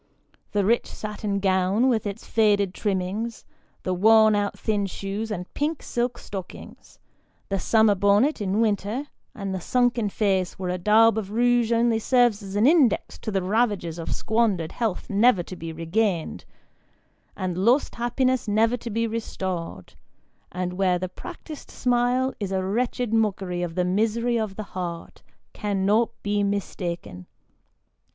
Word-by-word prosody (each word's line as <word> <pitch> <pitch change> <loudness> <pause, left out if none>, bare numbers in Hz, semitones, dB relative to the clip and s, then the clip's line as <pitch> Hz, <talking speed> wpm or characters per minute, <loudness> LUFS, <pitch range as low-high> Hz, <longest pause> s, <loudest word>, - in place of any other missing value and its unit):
The 205 -2 +2
rich 235 +4 +2
satin 210 -1 -4
gown 190 +4 +2
with 225 -5 +1
its 200 +2 -6
faded 205 -4 +2
trimmings, 205 +4 -3 0.4
the 185 - -1
worn 220 +3 +5
out 205 -1 -1
thin 205 -3 -1
shoes, 200 +3 -4
and 180 -4 -5
pink 300 +1 -2
silk 240 0 -2
stockings, 190 -5 -9 0.5
the 195 -1 0
summer 220 +1 +4
bonnet 205 +8 +2
in 200 +2 0
winter, 215 +4 0 0.3
and 195 -2 -4
the 190 - -3
sunken 245 0 +1
face, 190 -3 0
where 185 -1 -3
a 180 - -3
daub 220 +4 +5
of 200 -3 -6
rouge 240 +1 +2
only 230 -1 +2
serves 240 -2 +3
as 195 -1 -8
an 210 +3 +3
index 290 -4 +3
to - - -5
the 195 -3 0
ravages 195 -5 0
of 165 - -5
squandered 220 -8 0
health 225 -6 -2
never 205 -2 +3
to 185 - -9
be 165 -1 -6
regained, 165 +2 -1 0.9
and 185 -3 -2
lost 240 +9 +3
happiness 250 +1 0
never 225 +3 +2
to 235 - -7
bo 230 +2 0
restored, 190 - -4 0.6
and 180 0 -3
where 180 -1 +2
the 185 +1 -4
practised 315 - -10
smile 250 +1 +1
is 200 -3 -3
a 190 -1 0
wretched 235 +3 -1
mockery 195 -5 0
of 170 -2 -4
the 180 -1 +1
misery 225 +5 +1
of 215 -3 -3
the 215 - -5
heart, 175 -2 -6 0.3
cannot 205 +2 +1
be 205 0 0
mistaken. 175 - -3
210 Hz, 150 wpm, -24 LUFS, 190-230 Hz, 0.9 s, worn